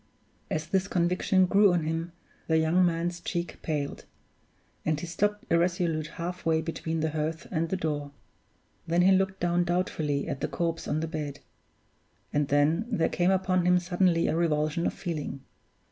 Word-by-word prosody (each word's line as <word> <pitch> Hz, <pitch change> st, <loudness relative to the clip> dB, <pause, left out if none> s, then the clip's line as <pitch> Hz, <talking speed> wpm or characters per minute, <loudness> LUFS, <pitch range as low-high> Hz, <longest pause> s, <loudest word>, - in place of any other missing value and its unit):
As 155 Hz, 0 st, -2 dB
this 190 Hz, +3 st, 0 dB
conviction 180 Hz, +1 st, +2 dB
grew 200 Hz, +1 st, +5 dB
on 175 Hz, -2 st, +1 dB
him, 165 Hz, +2 st, -2 dB, 0.4 s
the 160 Hz, -, +3 dB
young 160 Hz, +3 st, +3 dB
man's 170 Hz, 0 st, 0 dB
cheek 170 Hz, -1 st, -4 dB
paled; 145 Hz, -3 st, -3 dB, 0.8 s
and 155 Hz, -1 st, 0 dB
he 175 Hz, -, -5 dB
stopped 205 Hz, +5 st, -1 dB
irresolute 170 Hz, -2 st, +1 dB
half 180 Hz, +2 st, -4 dB
way 160 Hz, -1 st, +2 dB
between 160 Hz, 0 st, -3 dB
the 160 Hz, 0 st, 0 dB
hearth 155 Hz, +1 st, -3 dB
and 165 Hz, -1 st, 0 dB
the 190 Hz, -, -1 dB
door. 150 Hz, -4 st, -2 dB, 0.8 s
Then 170 Hz, +2 st, +3 dB
he 190 Hz, -, +6 dB
looked 190 Hz, 0 st, +2 dB
down 175 Hz, 0 st, +2 dB
doubtfully 165 Hz, -5 st, -1 dB
at 140 Hz, -, -4 dB
the -, -, 0 dB
corpse 165 Hz, -1 st, -2 dB
on 155 Hz, -, 0 dB
the 160 Hz, -, -2 dB
bed; 150 Hz, -3 st, -4 dB, 1.0 s
and 145 Hz, -1 st, +1 dB
then 150 Hz, +9 st, +2 dB
there 205 Hz, -9 st, +1 dB
came 175 Hz, +1 st, +1 dB
upon 185 Hz, -2 st, +2 dB
him 180 Hz, 0 st, +5 dB
suddenly 175 Hz, -1 st, +2 dB
a -, -, +1 dB
revulsion 155 Hz, 0 st, +1 dB
of -, -, -2 dB
feeling. 150 Hz, -5 st, -4 dB
170 Hz, 170 wpm, -28 LUFS, 155-180 Hz, 1.0 s, he